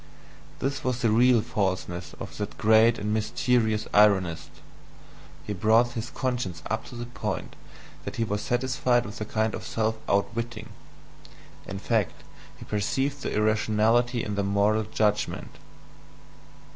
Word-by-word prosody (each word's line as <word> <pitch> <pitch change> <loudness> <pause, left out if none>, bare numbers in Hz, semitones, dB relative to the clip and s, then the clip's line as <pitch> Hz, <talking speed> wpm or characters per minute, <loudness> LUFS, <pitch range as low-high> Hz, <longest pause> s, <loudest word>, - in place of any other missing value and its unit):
This 140 +2 -2
was 125 -2 -1
the 115 - +4
real 120 +1 +5
FALSENESS 95 -4 -2
of - - -7
that 105 0 -4
great 110 +2 +5
and 105 +1 -2
mysterious 110 0 +1
ironist; 95 -6 +3 1.0
he 105 - -3
brought 110 +5 +3
his 120 -1 -5
conscience 120 -10 -3
up 110 0 -1
to 125 - -10
the 120 0 -5
point 120 - -5 0.5
that - - -6
he 115 - 0
was 105 -1 -2
satisfied 125 -1 +1
with 105 +1 -8
a - - -1
kind 110 +1 0
of - - -5
self 110 0 -1
outwitting: 110 +2 -1 1.0
in 100 - -5
fact, 105 -1 -1 0.3
he - - -10
perceived 135 +7 -1
the - - -3
irrationality 110 +3 +2
in 105 - -3
the 100 0 0
moral 100 +2 +2
judgment. 105 0 -1
110 Hz, 140 wpm, -26 LUFS, 105-120 Hz, 1.0 s, real